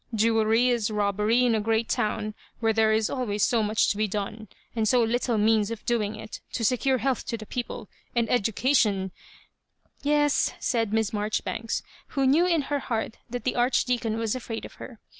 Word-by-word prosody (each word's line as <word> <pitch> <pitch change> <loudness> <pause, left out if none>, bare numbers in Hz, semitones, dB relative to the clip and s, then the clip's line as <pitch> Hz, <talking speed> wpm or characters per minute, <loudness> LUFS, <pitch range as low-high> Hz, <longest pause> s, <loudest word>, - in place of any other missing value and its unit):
Jewellery 225 +2 +3
is 235 -3 +1
robbery 210 +3 +2
in 240 - +3
a 220 - +1
great 225 +1 +1
town 215 0 -1 0.3
where 225 -1 +2
there 220 0 +3
is 220 -1 +2
always 210 -6 -1
so 240 -4 +2
much 215 +1 +2
to 205 - -3
be 215 0 +1
done, 210 +2 -4 0.3
and 220 -1 +1
so 245 +1 +4
little 235 0 0
means 215 0 +3
of 230 -2 -6
doing 220 -3 0
it; 215 - -9
to 230 - -1
secure 260 +3 +2
health 255 +1 -1
to 230 - -2
the 215 - -9
people, 240 -2 -5 0.3
and 235 -1 +2
education 215 -4 +2 0.3
" - - -35
" - - -49 0.2
Yes," 295 0 +2
said 225 -4 0
Miss 220 -1 0
Marjoribanks, 215 +2 -2 0.3
who 270 - +3
knew 310 +7 +4
in 335 -4 +2
her 285 +1 -1
heart 225 -3 -3
that 245 +1 -5
the 255 - -1
Archdeacon 240 -2 +1
was 225 -2 -1
afraid 235 -3 -5
of - - -11
her. - - -9
225 Hz, 195 wpm, -26 LUFS, 215-245 Hz, 0.3 s, so